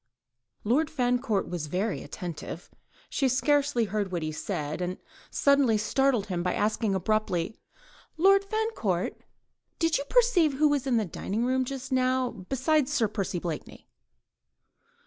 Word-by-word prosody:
Lord 285 +9 +2
Fancourt 245 -6 0
was 170 -4 -4
very 190 +6 -1
attentive. 170 -1 -7 0.4
She 270 -2 +1
scarcely 280 -1 +2
heard 200 -1 -2
what 175 -3 -2
he 155 - -2
said, 155 -2 -4
and 180 +1 -2 0.3
suddenly 280 -6 +3
startled 240 +1 +1
him 180 -4 -2
by 180 0 0
asking 215 -1 0
abruptly,— 200 -1 0 0.6
"Lord 390 +4 +5
Fancourt, 395 - -2 0.6
did 330 -3 +2
you - - -2
perceive 400 - +3
who 300 +3 +3
was 285 -2 0
in 245 -3 +3
the 220 - +1
dining 205 +6 -3
room 260 +1 +1
just 265 0 -6
now 255 -1 +2
besides 265 - 0
Sir 235 -7 +2
Percy 195 -3 -3
Blakeney?" 170 -3 -6
240 Hz, 140 wpm, -28 LUFS, 190-280 Hz, 0.6 s, Lord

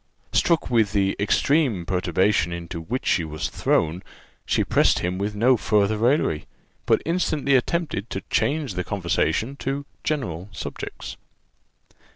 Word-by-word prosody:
Struck 170 -6 +2
with 110 -4 +3
the 100 -1 +2
extreme 115 - +2
perturbation 90 0 +1
into 85 -1 -5
which 120 +11 -4
he 85 - +3
was 75 -1 -4
thrown, 80 +3 0 0.5
she - - +2
pressed - - +3
him 90 +1 -2
with 105 +1 -2
no 120 +4 +4
farther 105 0 +2
raillery, 120 - +1 0.4
but - - +3
instantly 155 -4 0
attempted 130 - 0
to 95 - -4
change 145 -6 0
the 90 0 -2
conversation 100 +7 -1
to 140 +1 -3 0.2
general 95 - -3
subjects. - - -7
105 Hz, 135 wpm, -24 LUFS, 90-135 Hz, 0.5 s, no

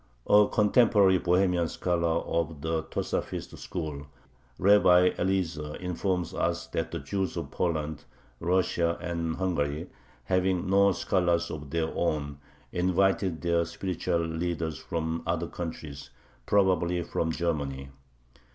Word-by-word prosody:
A 105 0 +6
contemporary 105 -3 +4
Bohemian 90 -1 +2
scholar 85 -1 0
of 80 -3 -2
the 80 0 -1
Tosafist 80 - -3
school, 75 -5 -5 0.5
Rabbi 90 -2 +5
Eliezer, 85 -5 -1
informs 90 -1 -2
us - - -1
that - - -2
the - - -4
Jews 95 -4 -3
of - - -5
Poland, 80 -4 -2 0.3
Russia, 85 -1 +1
and 85 -2 -2
Hungary, 80 -3 -2 0.3
having 90 +2 +1
no 100 +1 +5
scholars 85 -2 +1
of 75 -2 -7
their 80 0 -1
own, 70 -4 -1 0.3
invited 95 -1 +1
their 85 -1 +2
spiritual 85 0 -2
leaders 80 -1 -3
from 80 0 -3
other 85 0 0
countries, 80 -5 -7 0.4
probably 90 -3 +2
from 80 -1 -1
Germany. 70 -5 -2
85 Hz, 115 wpm, -28 LUFS, 80-95 Hz, 0.5 s, A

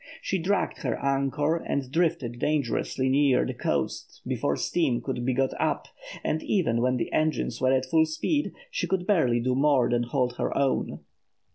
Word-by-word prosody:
She 190 - -2
dragged 185 +3 0
her - - -2
anchor 140 +3 0
and 140 -5 -3
drifted 135 -8 0
dangerously 135 -2 0
near 135 -1 +3
the - - -3
coast - - -3
before 70 - 0
steam 140 - 0
could 125 -3 -4
be 130 0 0
got 135 +1 +1
up, - - -1 0.3
and 155 - 0
even 135 - +1
when 125 +1 +2
the - - -3
engines 155 -6 0
were 130 0 +3
at 130 0 +2
full 160 +4 +3
speed, 290 - -1 0.2
she - - -2
could 185 -2 -1
barely 145 - +3
do 125 +2 0
more 135 -2 +3
than 120 0 +2
hold 125 0 -1
her - - -1
own. 140 -1 0
135 Hz, 175 wpm, -27 LUFS, 125-160 Hz, 0.3 s, near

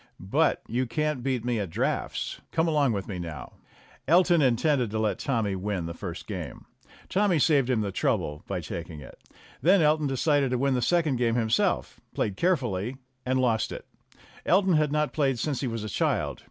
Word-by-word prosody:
"But - - +2
you 125 +3 -1
can't 150 +2 -1
beat 125 -2 -1
me 120 -2 0
at 100 -4 -3
draughts. - - -2
Come 165 +1 +1
along 145 -5 +2
with 100 -3 -3
you 95 -4 -5
now." 85 -3 -7 0.5
Elton 175 +1 +5
intended 130 -1 +2
to 110 - -3
let 105 -3 0
Tommy 110 -7 -1
win 95 -2 -3
the 85 - -5
first - - -7
game. - - -7 0.4
Tommy 195 -3 +2
saved 140 -3 +3
him 120 -4 +2
the 100 -2 -2
trouble 95 - -1
by - - -3
taking 80 - -7
it. 70 - -13 0.4
Then 190 +4 +5
Elton 150 0 +3
decided 140 +1 +1
to 125 - 0
win 135 +2 +1
the 125 - 0
second 160 -2 +2
game 120 -1 +1
himself, 115 -1 0 0.2
played 100 - -1
carefully 125 - 0 0.3
and 130 0 +2
lost 115 -5 +1
it. - - -7 0.6
Elton 190 0 +3
had 155 -2 +2
not 150 0 0
played 135 -4 +1
since 140 +2 -2
he 135 - -1
was 115 -2 -4
a - - -4
child. 105 - -1
125 Hz, 190 wpm, -27 LUFS, 110-150 Hz, 0.6 s, Elton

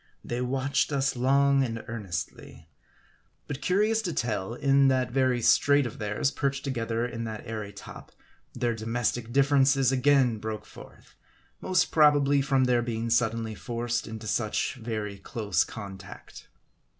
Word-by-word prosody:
They 120 +1 -3
watched 135 +3 0
us 135 -1 0
long 140 +2 +3
and 115 -3 -4
earnestly. 85 -7 -6 0.7
But 145 -1 -6
curious 210 +7 +2
to 180 -6 -3
tell, 110 -3 -2
in 140 0 +3
that 130 -2 +1
very 130 -2 +1
strait 145 +1 +4
of 120 - -7
theirs, 105 +6 -1
perched 140 0 -2
together 115 -3 -2
in 115 -1 -5
that 110 -1 -6
airy 110 -2 -5
top, - - -11 0.4
their 120 -1 0
domestic 115 +1 -2
differences 135 -1 +3
again 130 -3 +3
broke 110 0 -5
forth; - - -15 0.5
most 185 -1 +1
probably, 145 -2 +4
from 135 -1 +2
their 125 -1 +2
being 115 -1 -3
suddenly 115 -1 +1
forced 120 +1 -3
into 110 0 -8
such 110 0 -1
very 110 -5 -5
close 105 -7 -1
contact. 100 -3 -10
120 Hz, 140 wpm, -27 LUFS, 110-135 Hz, 0.7 s, strait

